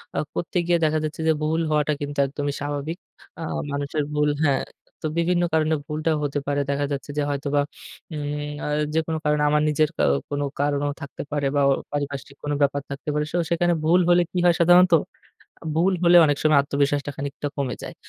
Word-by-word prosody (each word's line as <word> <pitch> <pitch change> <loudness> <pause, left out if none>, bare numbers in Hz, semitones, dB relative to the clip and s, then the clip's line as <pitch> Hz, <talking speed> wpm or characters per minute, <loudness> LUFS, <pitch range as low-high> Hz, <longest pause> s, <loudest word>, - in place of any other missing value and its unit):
আ - - -2 0.2
করতে 175 +1 -3
গিয়ে 175 0 +3
দেখা 155 0 +2
যাচ্ছে 155 +1 -4
যে 160 - +6
ভুল 160 +2 +1
হওয়াটা 150 0 +2
কিন্তু 145 0 -4
একদমই 145 +1 -3
স্বাভাবিক। 145 +3 -3 0.4
আ - - -6 0.3
মানুষের 145 +1 -2
ভুল 150 0 +2
হ্যাঁ। 140 -3 +2 0.4
তো - - -5
বিভিন্ন 175 +1 +2
কারণে 160 0 +2
ভুলটা 155 +1 -1
হতে 145 0 -1
পারে। 145 0 0
দেখা 140 0 0
যাচ্ছে 140 +1 -4
যে - - +2
হয়তোবা 145 0 0 0.5
উম 145 0 -4
আ - - -2 0.3
যেকোনো 160 0 0
কারণে 150 0 +2
আমার 150 0 +3
নিজের 150 0 +2
কা - - 0 0.3
কোনো 145 0 -1
কারণও 145 0 +1
থাকতে 140 - -7
পারে 145 -1 -1
বা 145 - +3
ও - - +5 0.2
পারিপার্শ্বিক 140 -1 -4
কোন 145 - -2
ব্যাপার 140 0 +2
থাকতে 140 +1 -6
পারে। 150 0 0
শো - - -1
সেখানে 175 +1 +2
ভুল 170 +3 +4
হলে 175 0 +6
কি - - -4
হয় 175 - +6
সাধারণত? 175 +1 +6 0.7
আ - - -12
ভুল 175 +4 +3
হলে 175 0 +6
অনেক 145 -2 +2
সময় 155 -2 +5
আত্মবিশ্বাসটা 145 +1 0
খানিকটা 140 +1 -4
কমে 135 -3 -1
যায়। - - -7
150 Hz, 195 wpm, -24 LUFS, 145-160 Hz, 0.7 s, যে